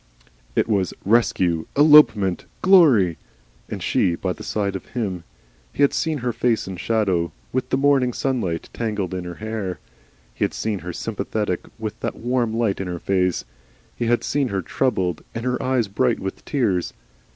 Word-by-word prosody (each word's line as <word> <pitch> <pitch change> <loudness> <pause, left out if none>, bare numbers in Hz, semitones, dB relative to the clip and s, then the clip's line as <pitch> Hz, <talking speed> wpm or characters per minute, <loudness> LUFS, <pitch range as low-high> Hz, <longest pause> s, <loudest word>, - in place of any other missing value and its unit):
It - - +2
was 100 -5 0
Rescue, 95 -7 +2
Elopement, 145 - +6 0.2
Glory! 140 - +5 0.5
And - - -5
she 85 - +2
by 90 +1 -2
the - - -13
side 100 -2 -2
of 95 - -6
him! 95 -8 -4 0.5
He - - +1
had 140 - +4
seen 160 -2 0
her 120 - 0
face 115 -4 0
in 95 -1 -6
shadow, 95 -5 0 0.2
with 130 - -1
the - - +1
morning 135 -2 +3
sunlight 115 -11 -2
tangled 105 -5 -2
in 90 -1 -4
her 90 0 -6
hair, 110 -3 -4 0.6
he - - -2
had - - -1
seen 110 -3 -2
her 90 0 -6
sympathetic 105 -1 -3
with 110 -2 -5
that - - -3
warm 120 -1 0
light 110 -4 0
in 95 - -4
her 90 -1 -3
face, 90 0 0 0.5
he 120 - -2
had 120 0 +2
seen 140 -2 0
her 95 -5 -2
troubled 95 - -1
and 115 +1 -4
her 125 -1 0
eyes 130 -4 +1
bright 120 +4 +1
with 95 0 -5
tears. 105 - 0
110 Hz, 175 wpm, -22 LUFS, 95-125 Hz, 0.6 s, Elopement